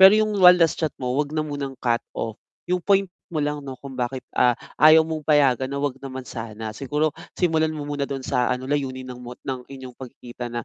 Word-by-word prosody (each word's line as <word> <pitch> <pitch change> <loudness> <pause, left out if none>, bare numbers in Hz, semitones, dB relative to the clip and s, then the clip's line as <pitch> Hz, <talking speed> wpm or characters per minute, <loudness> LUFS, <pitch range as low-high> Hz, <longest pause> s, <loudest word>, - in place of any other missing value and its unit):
Pero 195 +3 +10
'yung 215 0 +2
one 180 -1 +9
last 165 -2 +2
chat 155 -2 -1
mo 125 -1 -2
huwag 145 +2 0
na 155 - +1
munang 140 -3 -5
cut 120 -2 +1 0.2
off, 110 -1 -4 0.2
'yung 180 0 0
point 195 +1 +3 0.2
mo 170 - -6
lang 150 0 -1
'no 135 -2 -7
kung 135 +1 -10
bakit, 125 +1 -3
ah, 120 -1 +3 0.2
ayaw 155 +1 +8
mong 160 -1 -5
payagan 135 -4 +4
na 140 - -4
huwag 140 -2 -2
naman 130 -1 -7
sana. 110 -2 -6
Siguro 150 +6 -1 0.2
simulan 160 -3 +2
mo 150 - -4
muna 145 -1 -3
doon 135 -2 -4
sa 125 -1 +1
ano 125 0 -2
layunin 130 -2 -2
ng 125 - -11
mot 125 0 -9
ng 130 -2 -5
inyong 130 -2 -9
pagkikita 125 -1 -8
na 120 -1 -4
135 Hz, 225 wpm, -24 LUFS, 125-155 Hz, 0.2 s, Pero